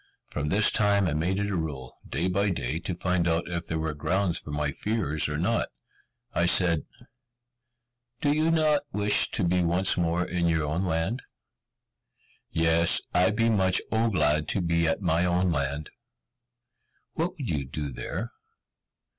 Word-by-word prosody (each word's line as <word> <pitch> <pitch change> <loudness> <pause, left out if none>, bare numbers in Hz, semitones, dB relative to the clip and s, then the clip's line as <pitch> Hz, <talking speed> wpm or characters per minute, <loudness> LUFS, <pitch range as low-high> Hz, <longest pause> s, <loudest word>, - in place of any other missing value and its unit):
From 75 0 -2
this 105 +4 +4
time 100 -2 +3
I 80 - 0
made 85 +5 0
it 100 0 -1
a - - -1
rule, 75 -7 -5
day 85 +5 -1
by 100 +3 +1
day, 80 -3 -2
to 85 +1 -4
find 90 -1 0
out 85 0 0
if 85 -1 -4
there 80 - -2
were 80 -1 -2
grounds 90 +4 -1
for - - -12
my 75 0 -1
fears 80 -6 -1
or 75 - -2
not. 100 +8 0 0.7
I 85 - +2
said, 85 -4 +3 1.3
"Do 145 -1 +2
you 155 +2 +2
not 155 -3 +3
wish 105 +1 +3
to 100 - 0
be 90 +1 +2
once 90 +3 +2
more 85 0 0
in 90 -1 -1
your 80 -2 +1
own 75 +4 -1
land?" 85 +8 -1 1.3
"Yes! 80 +1 +3
I 90 +1 +4
be 115 +2 +1
much 95 -5 +3
O 115 +1 +2
glad 75 -6 +1
to 95 - 0
be 85 -1 +1
at 80 +5 -1
my 85 -1 +2
own 90 0 +1
land." 70 0 -2 1.2
"What 170 +3 -2
would 135 - -3
you 75 -3 -1
do 70 +2 -5
there? - - -5
85 Hz, 170 wpm, -27 LUFS, 80-100 Hz, 1.3 s, this